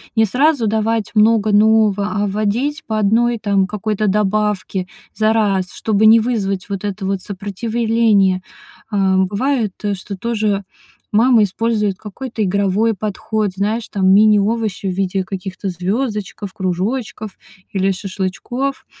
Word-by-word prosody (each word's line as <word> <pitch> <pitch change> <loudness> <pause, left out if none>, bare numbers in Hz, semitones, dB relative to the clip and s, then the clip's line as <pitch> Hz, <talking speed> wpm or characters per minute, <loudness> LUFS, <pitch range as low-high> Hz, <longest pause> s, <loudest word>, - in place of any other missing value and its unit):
Не 225 -1 +4
сразу 260 +2 +2
давать 220 0 0
много 215 0 +4
нового, 210 -1 +3
а - - 0
вводить 215 +10 -1
по 220 -1 -2
1, 230 +3 +2
там, 200 -3 +1
какой-то 210 +1 -2
добавке 205 -2 0 0.3
за 220 0 +2
раз, 195 -4 +1
чтобы 215 -1 +1
не 225 +1 +8
вызвать 205 -5 -2
вот 195 -1 -4
это 200 -1 -4
вот 195 -1 -1
сопротивление. 205 -1 +1 0.5
Э, 195 -2 +2
бывает, 210 +3 0 0.2
что 200 +1 -6
тоже 210 -2 -1 0.5
мама 230 +1 +5
использует 210 -1 0
какой-то 225 +3 -6
игровой 200 +3 +1
подход, 215 +1 -2
знаешь, 215 +3 -1
там, 190 -2 0
мини-овощи 210 0 +3
в - - 0
виде 190 0 -1
каких-то 190 +1 -6
звёздочков, 200 +1 -3
кружочков 205 +3 -3 0.4
или 195 0 +1
шашлычков. 195 +8 -4
210 Hz, 125 wpm, -18 LUFS, 195-225 Hz, 0.5 s, не